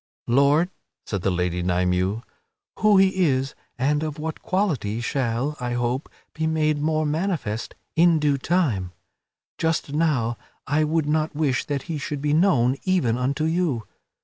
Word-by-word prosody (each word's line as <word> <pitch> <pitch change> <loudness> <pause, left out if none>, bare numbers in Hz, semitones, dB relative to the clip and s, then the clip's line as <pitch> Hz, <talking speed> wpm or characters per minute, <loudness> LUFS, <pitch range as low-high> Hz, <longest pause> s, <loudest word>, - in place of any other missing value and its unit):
"Lord," 140 +8 +3 0.3
said 100 -4 -3
the 95 - +1
Lady 90 -1 -1
Nymue, 90 +4 0 0.6
"who 215 -2 +5
he 190 -1 +4
is, 135 -3 +1 0.2
and 145 +4 +1
of 155 -1 -3
what 160 +1 -5
quality, 155 - -1
shall, 125 +3 -1
I 125 -1 -2
hope, 120 +3 -1 0.2
be 160 0 -1
made 155 -2 +1
manifest 155 - -1 0.2
in 170 0 +5
due 145 -2 +1
time; 130 - 0 0.7
just 160 -3 0
now 140 -8 +1 0.3
I 155 +3 +2
would 160 0 +1
not 155 0 0
wish 145 -4 0
that 140 -2 -2
he 165 -3 -4
should 145 +1 -4
be 145 +1 0
known 140 -7 +3
even 180 -12 +2
unto 135 +5 -1
you. 160 -8 0
145 Hz, 150 wpm, -24 LUFS, 120-160 Hz, 0.7 s, who